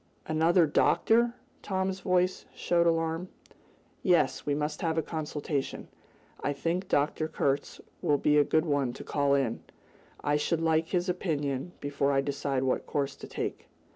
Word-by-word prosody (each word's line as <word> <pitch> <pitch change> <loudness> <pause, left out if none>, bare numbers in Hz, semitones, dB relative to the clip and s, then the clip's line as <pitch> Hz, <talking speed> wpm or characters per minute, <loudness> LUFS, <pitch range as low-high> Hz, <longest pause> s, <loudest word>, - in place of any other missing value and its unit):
"Another 165 +2 +4
doctor?" 235 +9 +3 0.3
Tom's 190 -1 -1
voice 185 -1 +1
showed 170 -1 +2
his - - +6
alarm. 165 +2 -2 0.7
"Yes, 165 -8 +2
we 145 - +2
must 150 +1 -2
have 165 -1 0
a 160 - +2
consultation. 150 -3 -3 0.5
I 145 - 0
think 170 +6 -2
Dr. 150 +1 +1
Kurtz 140 -3 -1 0.2
will 145 - +3
be 150 +1 +2
a - - +6
good 155 +3 +2
one 140 -5 0
to - - -9
call 140 -1 +1
in. 130 -5 0 0.6
I 145 0 +2
should 160 +2 0
like 160 0 +2
his 180 +1 0
opinion 155 -4 -2
before 140 0 0
I 135 -1 +3
decide 140 -1 -1
what 130 - 0
course 140 -2 -1
to - - -9
take." - - -4
155 Hz, 160 wpm, -29 LUFS, 140-170 Hz, 0.7 s, his